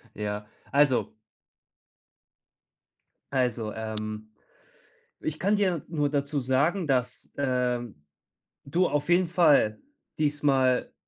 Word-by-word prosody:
Ja, 105 0 -4 0.2
also 140 -2 +3 2.2
Also, 120 -5 0
ähm, 110 -1 -5 0.9
ich 155 0 -3
kann 200 +4 +2
dir 185 -6 +1
nur 150 -3 0
dazu 140 0 -1
sagen, 145 +7 +1
dass, 125 -2 -1
äh, 125 -3 0 0.9
du 175 +6 +1
auf 145 +1 -1
jeden 175 +1 +4
Fall 150 -11 +4 0.4
diesmal 145 -4 +2
140 Hz, 90 wpm, -27 LUFS, 125-155 Hz, 2.2 s, jeden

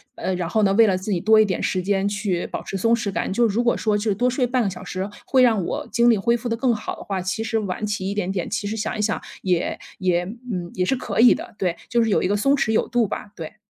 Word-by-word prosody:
呃， 190 - -2
然 180 -2 -2
后 215 +5 +1
呢， 200 -2 +3
为 230 +1 +7
了 195 -3 +2
自 190 +3 -4
己 180 - +1
多 220 +4 +5
一 - - +4
点 185 -4 -2
时 185 - 0
间 195 +1 0
去 200 -3 -1
保 - - -5
持 195 - -4
松 230 +4 +2
弛 230 -4 -3
感。 190 - -2
就 235 +2 +3
是 200 - -3
如 240 - +2
果 240 - +2
说 215 -2 0
就 210 0 0
多 245 +6 +1
睡 255 +1 +1
半 250 +1 0
个 200 - 0
小 180 - -8
时 190 +2 -4 0.2
会 260 - +3
让 225 -7 +3
我 - - -4
精 235 +2 +3
力 225 - +3
恢 235 +4 +2
复 240 +1 -6
得 230 - 0
更 240 0 +1
好 210 - -5
的 - - -10
话， 195 -2 -3
其 190 +4 -2
实 225 0 -1
晚 205 -2 -3
起 205 -2 -2
一 - - -2
点 205 -2 -2
点， 185 -3 -2
其 205 - -3
实 220 +2 -3
想 215 0 -3
一 - - -1
想 215 +1 0 0.2
也 180 -3 0 0.2
也 180 -2 +1
嗯， 205 -4 -6
也 180 - 0
是 265 - +1
可 255 - -4
以 245 +2 +8
的。 - - -8
对， 180 -3 -1
就 235 +1 +2
是 225 - 0
有 - - +3
一 - - +1
个 205 +2 +1
松 275 +7 +3
弛 230 -5 0
有 220 - +1
度 240 -2 +1
吧， 205 - -6
对。 165 +3 -8
210 Hz, 330 characters per minute, -22 LUFS, 190-230 Hz, 0.2 s, 以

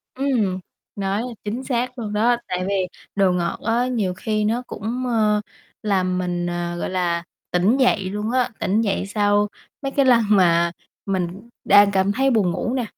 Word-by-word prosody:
Ừm, 240 -9 0 0.4
nói 200 +2 -1 0.2
chính 225 +5 -4
xác 250 0 -2
luôn 210 -3 -4
đó, 230 +4 +3
tại 180 0 -2
vì 200 - 0 0.4
đồ 195 -2 +3
ngọt 175 -1 -1
á 235 +2 +2
nhiều 215 -8 -1
khi 215 +3 -1
nó 230 +3 0
cũng, 235 +5 -4
ờ, 215 -3 +2 0.4
làm 185 -3 +1
mình, 175 -1 -2
à, 175 0 -3
gọi 175 - -3
là, 175 -2 0 0.3
tỉnh 185 +8 +3
dậy 250 -7 +3
luôn 210 +3 -3
á, 250 -1 +2
tỉnh 210 +4 +1
dậy 200 -3 -1
sau 205 0 +2 0.3
mấy 275 -1 -3
cái 275 0 +2
lần 240 -3 +5
mà 170 -4 +4 0.3
mình 195 +3 -3 0.2
đang 205 0 +6
cảm 195 0 +2
thấy 270 +6 +2
buồn 205 -7 +2
ngủ 240 +7 -2
nè. 255 -3 -1
205 Hz, 180 wpm, -22 LUFS, 185-235 Hz, 0.4 s, đang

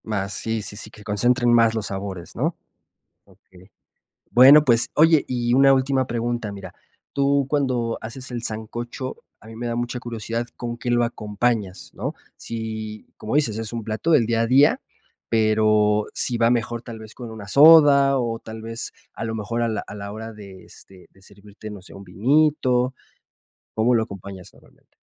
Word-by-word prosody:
Más, 100 -2 -3
sí, 110 -1 -3
sí, 100 - -8
sí, 110 - -8
que 105 -1 -15
concentren 120 +4 +2
más 115 -1 +4
los 110 -3 -2
sabores, 95 -3 -6
¿no? - - -1 0.7
Okey. 95 +1 -21 0.6
Bueno, 140 +5 +8
pues, 120 -3 +3
oye, 160 0 +5
y 120 -1 0
una 135 +1 +6
última 130 0 +1
pregunta, 120 -2 -3
mira. 100 0 -10 0.4
Tú 140 0 +1
cuando 130 -5 -1
haces 125 +4 -8
el 120 -1 -5
sancocho, 120 +3 -5 0.2
a - - -17
mí 110 - -11
me 120 +1 -5
da 120 - -2
mucha 120 +1 -3
curiosidad 115 0 -4
con 120 -1 -5
qué 120 +1 -4
lo 120 0 +3
acompañas, 105 -3 -2
¿no? - - -4 0.2
Si, 110 -2 -6
como 110 +4 -5
dices, 115 -8 +1
es 115 0 -5
un 115 -1 -4
plato 110 +10 -2
del 120 -7 +4
día 115 0 +1
a - - +1
día, 135 +5 +4 0.5
pero 110 -1 +2
si 120 - -1
va 115 0 +3
mejor 120 -1 -1
tal 115 -2 -9
vez 110 0 -12
con 120 -3 -8
una 110 -2 -9
soda 140 0 +7
o 115 -2 -2
tal 110 0 -9
vez 115 +1 -6 0.2
a - - -5
lo 110 0 -3
mejor 110 +2 -3
a 115 - +1
la 110 -2 -2
a 105 - -9
la 100 0 -7
hora 110 +1 -7
de, 100 -3 -12
este, 95 -2 -16
de 95 - -24
servirte, 100 +2 -13
no 100 -3 -10
sé, 95 - -13
un 100 - -10
vinito, 130 - +1 0.8
¿cómo 115 +3 +2
lo 115 - +3
acompañas 100 -3 -9
normalmente? - - -25
115 Hz, 185 wpm, -22 LUFS, 105-125 Hz, 0.8 s, Bueno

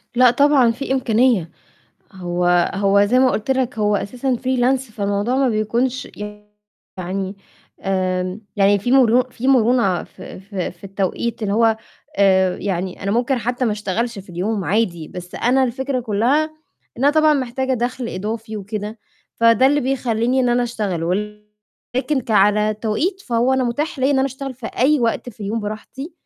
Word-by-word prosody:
لأ، 250 0 +6
طبعًا 275 -3 +4
في 265 +3 -5
إمكانية. 235 -8 +2 0.6
هو 175 -1 +1
هو 200 0 +3
زي 240 +5 +2
ما 260 0 +4
قُلت 215 - -2
لك 260 -4 0
هو 210 -1 +2
أساسًا 250 +6 -2
freelance، 255 -1 0
فالموضوع 205 +4 -1
ما 270 -1 +3
بيكونش 235 +4 -1 0.9
يعني 190 +2 -4 0.4
آمم 185 0 -1 0.2
يعني 200 0 +4
في 245 +6 -1
مرو 250 -2 +5
في 255 +1 -5
مرونة 235 -7 +3
في - - -11
في 195 -2 -4
في 175 +1 -17
التوقيت 195 +4 -3
اللي 200 -1 -1
هو 225 0 +3 0.4
آآ، 190 -2 +4
يعني 185 -2 -3
أنا 200 - -1
ممكن 245 +3 +1
حتى 245 +3 -2
ما 225 - +1
أشتغلش 210 +3 -2
في 195 -1 -11
اليوم 190 +3 -2
عادي، 180 -6 0
بس 180 0 -9
أنا 260 +2 +2
الفكرة 260 +2 -2
كلّها 240 +7 +1 0.5
إن 250 - -1
أنا 285 - +6
طبعًا 310 0 +4
محتاجة 260 0 -1
دَخْل 245 0 -3
إضافي 220 +3 -5
وكده، 210 +2 -5 0.4
فده 230 +2 +4
اللي 290 +2 +3
بيخلّيني 250 -1 0
إن 250 - +2
أنا 240 0 +2
أشتغل، 210 -8 -2
ولكن 210 - -4
ك 230 - -9
على 210 +1 +3
توقيت، 235 - -2
فهو 240 -3 +1
أنا 260 -1 +1
مُتاح 280 +5 -2
ليّا 265 +2 +2
إن 275 - +2
أنا 265 - +2
أشتغل 270 0 -6
في 240 -2 -8
أي 275 +5 +2
وقت 235 +1 -1
في 220 -2 -13
اليوم 210 +3 -2
براحتي، 220 - -7
230 Hz, 165 wpm, -20 LUFS, 200-255 Hz, 0.9 s, لأ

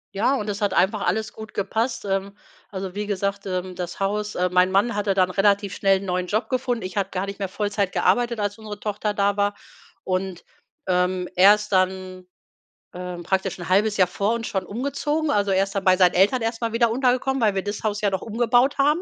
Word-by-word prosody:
Ja, 235 +7 +2
und 215 -5 -3
es 205 +1 -3
hat 200 -2 0
einfach 200 +4 +2
alles 220 0 -1
gut 220 -1 -10
gepasst. 225 +5 -1
Ähm, 195 +1 -2 0.3
also 190 -2 -5
wie 205 +1 -4
gesagt, 200 0 -2
ähm, 185 0 -3
das 175 +1 -6
Haus, 210 +2 -1
ähm 180 0 0
mein 180 +1 +4
Mann 205 +5 +2
hatte 205 -1 0
dann 185 -1 +2
relativ 200 0 +2
schnell 195 -1 +3
'n - - -7
neuen 180 -1 -1
Job 215 +5 -1
gefunden. 250 -3 -1
Ich 185 +2 -7
habe 195 -1 0
gar 185 +1 -2
nicht 200 +1 -7
mehr 195 - -1
Vollzeit 205 -1 -1
gearbeitet, 240 -2 +1
als 205 +1 -2
unsere 210 -1 -8
Tochter 210 0 -2
da 200 0 +1
war. 205 0 +1 0.5
Und, 185 -1 -3 0.4
ähm, 180 0 0
er 195 +3 +8
ist 210 0 -7
dann, 185 -1 -1 0.7
ähm, 180 -1 -6
praktisch 190 0 -1
'n 175 - -6
halbes 205 +3 +2
Jahr 185 - +4
vor 200 +4 -1
uns 235 -1 -3
schon 190 -2 -2
umgezogen. 280 +7 -2
Also, 205 -5 +1
erst 195 +1 +1
dann 195 - -1
bei 185 -1 +4
seinen 180 -2 +5
Eltern 205 +8 +3
erst 225 +1 -2
mal 230 -1 -1
wieder 235 0 +2
untergekommen, 255 +2 +1
weil 215 -3 +3
wir 190 - -1
das 205 0 -5
Haus 210 -1 -1
ja 205 - +1
noch 190 -1 -2
umgebaut 240 +4 +2
haben. 295 +4 +3
200 Hz, 220 wpm, -23 LUFS, 190-220 Hz, 0.7 s, er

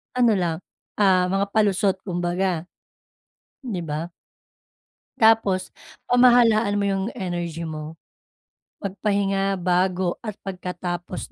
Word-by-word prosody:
ano 240 -2 +4
lang, 170 -4 0 0.4
ah, 185 -3 +4
mga 195 +1 +1
palusot 200 -2 +2
kumbaga, 175 -1 -1 1.0
di 230 -8 -4
ba? 155 +2 -4 1.1
Tapos, 220 -4 +3 0.3
pamahalaan 235 -4 +4
mo 205 - 0
yung 195 -1 0
energy 175 -3 -4
mo. 155 0 -6 0.9
Mag-pahinga 195 0 0
bago 180 0 0
at 215 -3 -6
pagkatapos 180 -1 -5
190 Hz, 95 wpm, -23 LUFS, 175-205 Hz, 1.1 s, ano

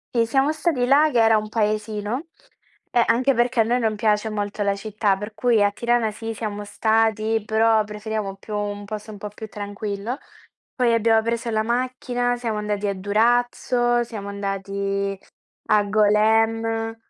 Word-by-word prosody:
Si, 230 - +4
siamo 270 +6 +2
stati 310 -6 0
là 290 +4 +5
che 235 -3 +3
era 225 -1 +5
un 215 0 -3
paesino 215 +5 -2 0.6
e 240 -1 +4
anche 255 +4 +3
perché 240 -1 +1
a - - +7
noi 240 +3 +1
non 220 -2 0
piace 210 0 +1
molto 205 0 -3
la 200 0 +1
città 205 -1 -1
per 210 +2 -7
cui 225 0 +2
a 205 - +4
Tirana 235 0 0
sì 225 +1 -6
siamo 210 -1 -5
stati 220 +1 +1
però 220 0 +3
preferiamo 210 -1 -4
più 210 +2 -7
un 205 0 -3
posto 215 +1 -7
un 205 - -9
po' 210 - -6
più 220 +1 -9
tranquillo. 205 +3 -5 0.6
Poi 245 -3 +2
abbiamo 225 0 +4
preso 230 +1 -2
la 215 -1 +1
macchina, 245 0 -1
siamo 230 -3 -3
andati 210 -1 -2
a 200 - 0
Durazzo, 240 +4 +1
siamo 215 -4 -7
andati 195 0 -3 0.5
a 210 -1 +4
Golem. 225 +2 +2
220 Hz, 165 wpm, -23 LUFS, 205-235 Hz, 0.6 s, a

